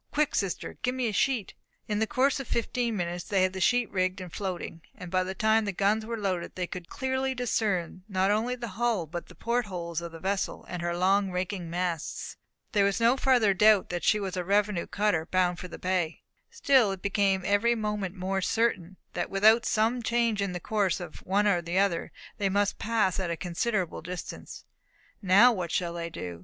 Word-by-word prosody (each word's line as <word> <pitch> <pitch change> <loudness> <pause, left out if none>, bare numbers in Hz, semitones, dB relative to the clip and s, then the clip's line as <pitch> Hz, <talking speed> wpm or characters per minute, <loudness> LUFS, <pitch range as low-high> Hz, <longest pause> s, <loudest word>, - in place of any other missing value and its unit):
Quick, 300 -1 +1
sister, 195 -3 -2
get 250 0 -1
me 255 -2 0
a - - -4
sheet!" 235 -2 0 0.3
In 210 -1 -1
the 220 - +1
course 270 +5 +2
of 270 - -6
fifteen 235 -1 -1
minutes 175 -1 -3
they 195 -2 +2
had 185 0 +1
the 190 - -5
sheet 245 +4 +3
rigged 185 0 0
and 180 -3 -8
floating; 180 -4 -5
and 180 -2 -9
by 185 0 +2
the 190 +1 -5
time 220 +2 +3
the 200 - -1
guns 205 +3 +1
were 230 0 -3
loaded, 185 -5 -2
they 180 - -2
could 175 -1 -8
clearly 260 0 -1
discern 205 -8 -1
not 190 0 +2
only 230 +4 0
the 235 -2 -6
hull, 235 -8 +1
but 170 +3 -6
the 180 - -15
port 235 +6 0
holes 170 -3 -4
of 170 -1 -6
the 165 - -10
vessel, 195 +2 -2
and 180 -1 -5
her 175 0 -2
long 195 +2 +3
raking 180 -1 -3
masts. 175 -2 -3 0.4
There 205 -4 +3
was 200 +2 +1
no 230 +2 +4
further 250 -7 +3
doubt 210 0 +5
that 175 -1 -3
she 215 - +3
was 195 -2 -3
a 180 - -2
revenue 200 -1 +1
cutter 195 -6 0
bound 180 -1 +1
for 180 - -6
the 175 - -9
bay. 180 -3 -1 0.3
Still 260 -7 +3
it 190 -1 -6
became 200 -2 +1
every 225 +4 +3
moment 210 -4 -3
more 190 +1 -2
certain 190 -4 0 0.2
that - - -2
without 220 +4 +4
some 225 +3 +1
change 230 -2 +1
in 200 -2 -1
the 180 - -3
course 200 0 0
of 175 -3 -9
one 200 +3 +2
or 185 -4 +3
the 170 +2 -3
other, 195 -4 +1 0.3
they 200 -1 +1
must 200 +1 0
pass 215 -5 +1
at 185 -2 -2
a 170 - -2
considerable 185 +2 -2
distance. 180 +2 -7 0.6
Now 200 +6 +6
what 180 -7 -3
should 170 -1 -1
they 170 -1 -4
do? 90 - -7
195 Hz, 210 wpm, -28 LUFS, 180-220 Hz, 0.6 s, Now